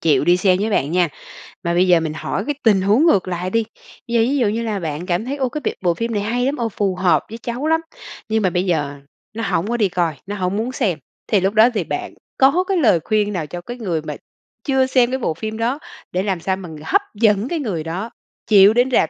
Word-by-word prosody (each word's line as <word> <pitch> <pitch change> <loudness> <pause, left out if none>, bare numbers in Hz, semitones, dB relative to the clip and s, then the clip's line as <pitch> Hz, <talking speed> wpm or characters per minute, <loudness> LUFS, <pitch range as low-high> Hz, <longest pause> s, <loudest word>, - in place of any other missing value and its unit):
chịu 145 -4 +3
đi 175 +1 +5
xem 185 0 +3
với 215 +1 0
bạn 150 -5 0
nha. 180 -2 +3 0.6
Mà 170 0 0
bây 180 +1 +3
giờ 175 -2 +5
mình 160 -1 -3
hỏi 185 +5 -3
cái 295 - -1
tình 205 -5 +4
huống 215 - +3
ngược 195 - +3
lại 180 0 -3
đi. 230 +3 +1 0.4
Bây 235 - -2
giờ 230 - +4
ví 270 +5 +1
dụ 240 -5 +2
như 225 +3 -1
là 215 -3 -2
bạn 160 +1 -4
cảm 180 +4 -1
thấy, 275 +3 -3
ô, 260 -2 0
cái 300 - -5
b - - -3 0.2
bộ 175 -1 +3
phim 230 +5 -3
này 205 - 0
hay 245 +3 0
lắm, 280 +2 0
ồ, 230 -2 -1
phù 195 -2 -1
hợp 175 -5 +2
với 225 - -7
cháu 245 +5 -4
lắm 320 0 +2 0.5
nhưng 220 0 +1
mà 185 - +3
bây 180 +2 -1
giờ 145 -5 -1 0.3
nó 225 +1 -4
hổng 175 +5 0
có 240 - -1
đi 210 -4 +2
coi, 170 -3 0
nó 205 +2 -5
hổng 185 0 -1
muốn 235 +4 -2
xem, 195 - -1 0.3
thì 210 - +3
lúc 195 +2 0
đó 220 +3 +6
thì 215 - 0
bạn - - -4 0.2
có 275 +7 +4
cái 390 - +1
lời 220 - +4
khuyên 210 -1 0
nào 165 -4 -2
cho 175 +4 -7
cái 240 +7 -8
người 180 -9 -2
mà 155 - -6 0.5
chưa 265 -2 +2
xem 255 -1 +2
cái 260 - 0
bộ 165 - -1
phim 220 +6 -5
đó 245 +6 -1 0.3
để 185 +2 -1
làm 190 -4 -1
sao 190 +3 -1
mà 185 -3 -9 0.2
hấp 400 - +3
dẫn 210 +1 +2
cái 335 +1 -2
người 190 - -3
đó 185 +8 -4 0.4
chịu 205 0 +7
đến 245 +2 +2
rạp - - +3
205 Hz, 265 wpm, -20 LUFS, 180-240 Hz, 0.6 s, chịu